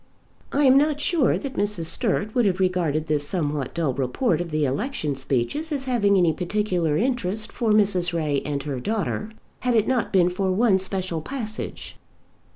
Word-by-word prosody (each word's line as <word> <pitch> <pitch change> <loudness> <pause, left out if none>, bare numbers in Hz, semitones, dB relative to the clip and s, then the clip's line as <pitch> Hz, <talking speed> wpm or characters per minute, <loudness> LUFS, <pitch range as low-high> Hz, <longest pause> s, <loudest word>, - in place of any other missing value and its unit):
I 290 - +2
am 265 0 +7
not 295 0 +1
sure 300 -2 +2
that 275 -2 -5
Mrs. 205 -5 -1
Sturt 215 +3 0
would 245 -2 +2
have 190 -1 +1
regarded 175 -5 0
this 150 -2 0
somewhat 150 -7 -2
dull 160 -6 0
report 150 - 0
of 175 - -5
the 155 -1 0
election 150 - -2
speeches 135 - -2
as 280 -3 -2
having 215 -6 +2
any 170 -3 +3
peculiar 180 -3 0
interest 220 -3 -1
for 235 -3 -1
Mrs. 195 -4 +3
Ray 150 -4 0
and 145 -2 -3
her 140 -3 -4
daughter 215 - -2 0.3
had 250 -1 0
it 220 -1 +3
not 255 -4 0
been 180 -2 +3
for 190 +1 -1
one 195 0 +3
special 185 -3 -3
passage. 220 - -6
190 Hz, 175 wpm, -24 LUFS, 155-235 Hz, 0.3 s, am